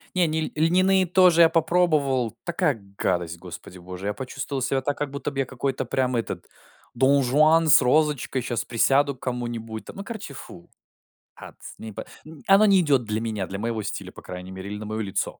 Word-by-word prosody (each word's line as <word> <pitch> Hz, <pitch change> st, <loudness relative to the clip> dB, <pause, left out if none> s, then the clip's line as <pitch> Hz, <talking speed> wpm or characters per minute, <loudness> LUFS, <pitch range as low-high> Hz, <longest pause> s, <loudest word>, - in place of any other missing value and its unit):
Не, 180 Hz, -2 st, +3 dB
ни 160 Hz, 0 st, -1 dB
ль 155 Hz, -, -3 dB
льняные 185 Hz, +4 st, +3 dB
тоже 180 Hz, -1 st, +5 dB
я 165 Hz, -, +7 dB
попробовал, 155 Hz, -8 st, +1 dB
такая 170 Hz, -4 st, 0 dB, 0.2 s
гадость, 85 Hz, -2 st, -1 dB
господи 90 Hz, +1 st, -10 dB
боже, 90 Hz, +2 st, -7 dB
я 105 Hz, -, -1 dB
почувствовал 130 Hz, +4 st, -5 dB
себя 135 Hz, +1 st, 0 dB
так, 145 Hz, +2 st, -2 dB
как 145 Hz, -2 st, -3 dB
будто 140 Hz, +1 st, -4 dB
б, 135 Hz, -, -5 dB
я 135 Hz, -, +1 dB
какой-то 130 Hz, +1 st, -3 dB
прям, 130 Hz, +1 st, 0 dB
этот, 115 Hz, -, -4 dB, 0.5 s
донжуан 140 Hz, +5 st, +4 dB
с 140 Hz, -3 st, +7 dB
розочкой, 140 Hz, -1 st, +1 dB
щас 120 Hz, -1 st, -3 dB
присяду 135 Hz, +4 st, +2 dB
к 130 Hz, -, -28 dB
кому-нибудь 120 Hz, -3 st, -5 dB
там. -, -, -11 dB
Ну, 195 Hz, -, -5 dB
короче, 215 Hz, -9 st, -7 dB
фу. 85 Hz, -9 st, -12 dB, 0.7 s
Атс -, -, -12 dB
не 110 Hz, -, -8 dB
по -, -, -7 dB, 0.4 s
Оно 195 Hz, +2 st, +6 dB
не 195 Hz, -3 st, +5 dB
идёт 140 Hz, -7 st, +2 dB
для 105 Hz, +1 st, -2 dB
меня, 110 Hz, -5 st, -3 dB
для 100 Hz, +1 st, -6 dB
моего 115 Hz, -1 st, -2 dB
стиля, 100 Hz, -2 st, -5 dB
по -, -, -13 dB
крайней 90 Hz, +1 st, -8 dB
мере, 95 Hz, +1 st, -7 dB
или 105 Hz, -, -4 dB
на 105 Hz, -, -7 dB
моё 110 Hz, +1 st, -3 dB
лицо, 95 Hz, -2 st, -3 dB
130 Hz, 200 wpm, -24 LUFS, 110-155 Hz, 0.7 s, я